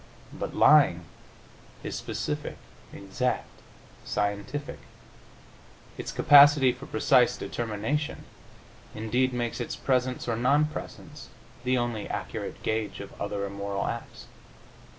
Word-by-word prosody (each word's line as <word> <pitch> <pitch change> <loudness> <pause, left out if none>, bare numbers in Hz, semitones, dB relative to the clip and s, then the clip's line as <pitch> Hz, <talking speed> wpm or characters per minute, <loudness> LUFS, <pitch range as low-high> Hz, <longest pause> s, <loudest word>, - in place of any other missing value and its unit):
But - - -5
lying 135 - +5 0.8
is - - -4
specific, - - -4 0.3
exact, 100 +6 -2 0.6
scientific. 105 +8 -3 1.2
Its - - -5
capacity 145 -2 +7
for 130 +3 -10
precise 125 -3 +3
determination, 120 +7 -3 0.7
indeed, 120 +4 0
makes 120 0 -3
its 120 - -4
presence 130 -1 -1
or 115 - 0
non 140 +6 +3
presence 150 -1 -8 0.3
the 130 +1 +2
only 120 -3 -2
accurate - - -5
gauge 110 -3 -2
of 100 - -9
other 100 0 -2
immoral 100 0 -3
acts. 115 - -6
120 Hz, 105 wpm, -27 LUFS, 105-135 Hz, 1.2 s, capacity